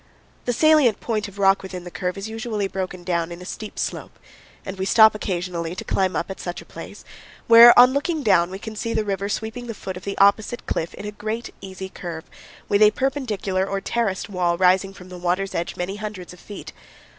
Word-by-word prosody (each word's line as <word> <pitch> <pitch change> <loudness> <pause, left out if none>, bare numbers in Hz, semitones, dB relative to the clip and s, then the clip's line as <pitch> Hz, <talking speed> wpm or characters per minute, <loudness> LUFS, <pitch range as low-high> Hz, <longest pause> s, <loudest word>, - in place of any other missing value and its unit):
The 245 - +1
salient 300 -6 +4
point 215 -2 -2
of 200 0 -13
rock 195 0 +4
within 185 -2 -7
the 175 - -9
curve 180 +1 -3
is 195 +2 -5
usually 220 -2 -3
broken 185 -2 -5
down 170 -1 -1
in 170 - -7
a 180 - -10
steep 215 +3 -7
slope, - - -4 0.5
and 190 0 -6
we - - -1
stop 220 +1 +6
occasionally 175 -4 -3
to - - -6
climb 190 -1 0
up - - -2
at 190 - -8
such 175 -1 -5
a - - -12
place, - - -10 0.4
where 230 +1 +9
on 250 +1 +8
looking 300 +2 -1
down 180 -6 +4
we 190 - -6
can 220 +2 -8
see 230 +2 -3
the 220 -1 0
river 200 0 -2
sweeping 225 +3 -4
the 230 - -5
foot 190 -2 -6
of 180 - -11
the 200 - -4
opposite 210 +4 +3
cliff 165 - -3
in - - -8
a 210 - -4
great, 220 +3 -5
easy 190 0 -7
curve, 170 -3 -7 0.4
with 205 +1 +2
a 210 - +8
perpendicular 215 -7 -1
or 195 0 -2
terraced 200 -2 -2
wall 180 -3 0
rising 185 +2 +3
from 185 -1 -13
the 180 -1 -9
water's 180 +2 -1
edge 170 - -3
many 190 +3 -4
hundreds 210 -4 -7
of 180 - -15
feet. 205 - -10
195 Hz, 220 wpm, -23 LUFS, 185-220 Hz, 0.5 s, where